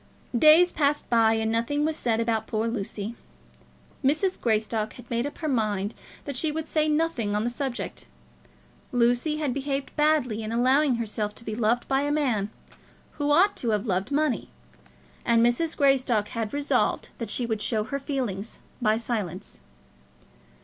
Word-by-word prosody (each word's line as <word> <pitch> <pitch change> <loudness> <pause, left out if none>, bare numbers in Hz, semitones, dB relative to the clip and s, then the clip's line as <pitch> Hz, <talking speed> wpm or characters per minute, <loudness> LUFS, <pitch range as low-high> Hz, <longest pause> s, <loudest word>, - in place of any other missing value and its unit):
Days 315 +7 +7
passed 290 0 0
by, 225 -1 +5
and 220 0 0
nothing 260 +6 0
was 315 0 0
said 230 -6 0
about 225 -1 0
poor 220 0 -1
Lucy. 215 -1 -4 0.9
Mrs. 310 +8 +1
Greystock 220 -1 0
had 245 -1 -13
made 235 +3 0
up 290 - -9
her 315 - -3
mind 215 -6 0 0.3
that 280 - -4
she 305 +4 +1
would 315 +1 -4
say 310 -1 +1
nothing 300 -9 0
on 210 - 0
the 240 - -1
subject. 265 -1 -4 0.8
Lucy 245 +5 +2
had 295 -5 -1
behaved 275 0 -3
badly 295 -8 +2
in 215 0 -4
allowing 260 +3 +3
herself 215 -2 -3
to - - -9
be 220 - -4
loved 235 +2 +1
by 270 0 +2
a 290 +1 0
man 250 -9 0 0.7
who 290 0 +1
ought 375 +7 +5
to 235 - -2
have 210 -1 0
loved 190 +3 -1
money, 285 -6 0 0.7
and 230 0 +4
Mrs. 310 +7 +1
Greystock 255 -7 +2
had 225 -2 -3
resolved 290 0 0
that 230 - -4
she 245 - 0
would 220 -2 -2
show 215 -1 +1
her 280 +5 -4
feelings 245 -8 -3 0.2
by 215 -1 +3
silence. 210 -6 -4
240 Hz, 165 wpm, -26 LUFS, 220-290 Hz, 0.9 s, Days